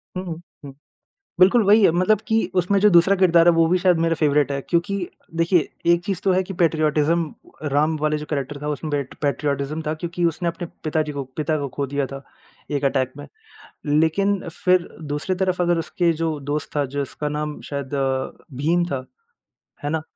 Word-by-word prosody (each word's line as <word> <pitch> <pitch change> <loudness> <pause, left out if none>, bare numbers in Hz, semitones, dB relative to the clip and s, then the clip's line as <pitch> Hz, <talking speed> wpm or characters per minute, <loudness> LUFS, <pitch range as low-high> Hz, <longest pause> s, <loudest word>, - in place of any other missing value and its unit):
हुँ, 175 -3 -5 0.2
हुँ। 140 - -9 0.7
बिल्कुल 195 +6 +6
वही 210 +3 +6
है। - - +7
मतलब 185 +5 +2
कि 225 -1 +2
उसमें 185 +2 +2
जो 210 - +6
दूसरा 175 +2 +5
किरदार 175 -3 +5
है - - +7
वो 165 0 +4
भी 180 +2 +3
शायद 180 -2 +3
मेरा 165 0 +2
फ़ेवरेट 150 -2 +2
है। 140 - -2
क्योंकि 175 +4 +1 0.4
देखिए 165 -1 +2 0.2
एक 170 0 +1
चीज़ 195 -1 -2
तो 190 - +4
है 185 +1 +2
कि 190 - -7
पैट्रियोटिज़्म 155 -1 +1 0.4
राम 155 +3 +2
वाले 155 0 +1
जो 150 - -7
कैरेक्टर 145 -1 -3
था 150 - -3
उसमें 150 +1 -3
बैठ 145 -2 -3
पैट्रियोटिज़्म 145 +1 -1
था 155 - 0
क्योंकि 170 +2 -3
उसने 170 +1 0
अपने 170 0 -5 0.2
पिताजी 155 -1 -1
को 140 -1 -4
पिता 155 0 0
को 140 -1 -3
ख़ो 140 - -1
दिया 140 0 -1
था 135 +1 -8 0.5
एक 145 -1 -1
अटैक 135 -2 +1
में। 145 - -9 0.6
लेकिन 160 +7 +2
फ़िर 180 +1 +1 0.2
दूसरी 150 +6 -1
तरफ़ 185 -1 0
अगर 175 -1 +2
उसके 170 +1 0
जो 160 -2 -1
दोस्त 145 +2 -4
था, 145 - +2
जिसका 140 +2 -4
नाम 150 0 -4
शायद 140 -2 -4 0.7
भीम 165 +6 +2
था, 135 -6 -4 0.8
है 145 - -1
ना? 160 +1 -1
160 Hz, 190 wpm, -22 LUFS, 145-175 Hz, 0.8 s, है